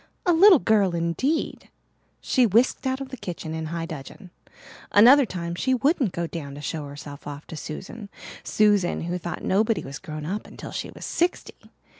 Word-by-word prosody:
A 350 - +4
little 365 +2 +8
girl 205 -8 +2
indeed! 170 - -1 0.5
She 250 -2 +3
whisked 235 +6 +2
out 260 +1 -1
of 270 - -6
the 260 - -7
kitchen 175 -6 -6
in 160 0 -4
high 165 +1 -3
dudgeon. 165 +4 -9 0.6
Another 250 +6 +7
time 170 -3 -4
she 260 +9 +1
wouldn't 270 - +1
go 170 0 -3
down 150 -4 -7
to - - -8
show 150 -1 -4
herself 145 0 -10
off 145 +1 -7
to - - -9
Susan 195 +7 -7 0.3
Susan, 205 -4 +2
who 175 +2 -3
thought 175 +1 -6
nobody 215 +3 +1
was 135 +1 -7
grown 155 -4 -7
up 200 +6 -4
until - - -9
she - - -4
was - - -9
sixty! 345 +1 -2
185 Hz, 180 wpm, -25 LUFS, 160-245 Hz, 0.6 s, little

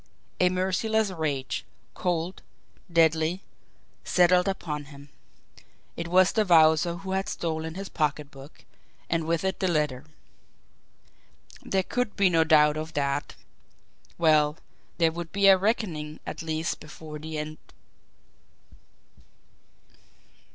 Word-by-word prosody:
A 180 - +4
merciless 195 +3 0
rage, 150 -6 -3 0.3
cold, 175 0 -2 0.5
deadly, 165 +2 +2 0.6
settled 180 0 +3
upon 150 -6 -3
him. 140 0 -14 0.9
It 170 - -5
was 185 +1 +4
the 220 - +2
Wowzer 165 -2 +4
who 190 +2 -7
had 190 0 -1
stolen 160 -1 -3
his 195 +1 -5
pocketbook, 145 -2 -4 0.5
and 165 -1 0
with 165 0 0
it 190 0 -1
the 190 - +1
letter. 150 -5 -1 1.6
There 190 -1 0
could 245 +2 -2
be 195 -3 +3
no 165 -1 +4
doubt 150 -1 +4
of 155 +1 -5
that. 140 0 -2 0.8
Well, 155 -2 +3 0.4
there 165 -1 +3
would 170 0 -7
be 200 0 +1
a 195 -1 +9
reckoning 180 -7 -2
at - - -6
least 160 0 -2
before 150 0 -10
the 155 +1 -6
end! 155 +1 -5
165 Hz, 115 wpm, -26 LUFS, 155-185 Hz, 1.6 s, a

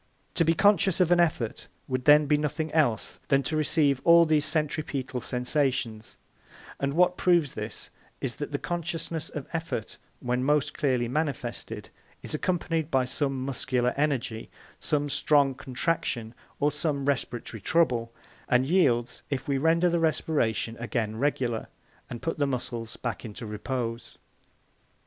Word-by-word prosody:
To 170 - +3
be 165 +1 +3
conscious 200 -1 +4
of 180 -2 +3
an 175 - +5
effort 150 -10 0 0.2
would 130 -1 -2
then 150 0 +7
be 150 +1 +3
nothing 150 +1 -2
else 120 - +1
than 140 0 +3
to 155 - -1
receive 150 -3 +2
all 170 0 +7
these 155 -2 +2
centripetal 150 -5 -2
sensations; 125 -3 -1 0.6
and 140 +1 -1
what 180 +1 +4
proves 170 -6 +3
this 105 0 -5 0.3
is, - - -3
that - - -5
the - - 0
consciousness 165 -2 -3
of 150 -4 -6
effort 165 -9 -4 0.2
when 125 0 -1
most 150 +1 +2
clearly 130 -5 +1
manifested 120 -6 -3 0.3
is - - -5
accompanied 165 -1 -1
by 130 -3 +2
some 135 0 -1
muscular 125 -2 0
energy, 135 -6 -1 0.3
some 145 -1 0
strong 140 -1 +3
contraction, 125 -4 -2 0.3
or 145 +1 +2
some 145 -2 -1
respiratory 120 -5 -2
trouble, 120 -6 +2 0.4
and 125 +1 +4
yields 125 -8 +2
if 140 +2 -3
we 140 -1 +1
render 165 +4 +3
the 170 -1 +2
respiration 150 -8 0
again 110 -2 -2
regular 125 -3 0 0.4
and 120 - -7
put 165 -1 -2
the 145 - +2
muscles 120 -3 -4
back 120 -2 -4
into 115 0 -7
repose. 115 +2 -4
140 Hz, 145 wpm, -27 LUFS, 120-160 Hz, 0.6 s, then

